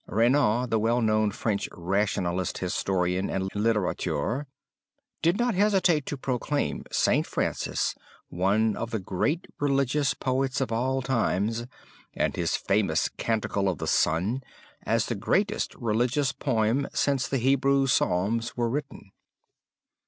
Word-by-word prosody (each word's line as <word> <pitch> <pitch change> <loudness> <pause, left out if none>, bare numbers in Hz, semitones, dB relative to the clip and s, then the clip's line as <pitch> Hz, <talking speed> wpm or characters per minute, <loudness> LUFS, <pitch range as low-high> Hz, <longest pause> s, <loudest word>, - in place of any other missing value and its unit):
Renan, 120 +2 +2
the 110 - +3
well 115 +3 +2
known 110 -2 +2
French 100 0 -2
rationalist 90 0 -1
historian 90 0 -1
and 95 0 -2
literateur, 105 - -1 0.7
did 170 +4 +2
not 240 0 +1
hesitate 190 -6 +2
to 145 - -3
proclaim 135 +3 -2
St. - - +2
Francis - - -1 0.3
one 100 +5 +1
of 115 - -4
the 110 - -2
great 105 - -1
religious 140 -1 +1
poets 130 +2 -1
of 135 -3 -1
all 130 +3 0
time 115 -5 +1 0.6
and - - 0
his - - 0
famous - - +1
Canticle 100 -3 -1
of 90 - -2
the - - -4
Sun 95 +12 +1 0.5
as 115 -2 +2
the - - -2
greatest 200 - 0
religious 125 +4 0
poem 130 0 0
since 135 -2 +1
the 135 - 0
Hebrew 135 +2 +3
Psalms 115 0 0
were 120 -1 0
written. 140 -8 -5
115 Hz, 130 wpm, -27 LUFS, 100-135 Hz, 0.7 s, the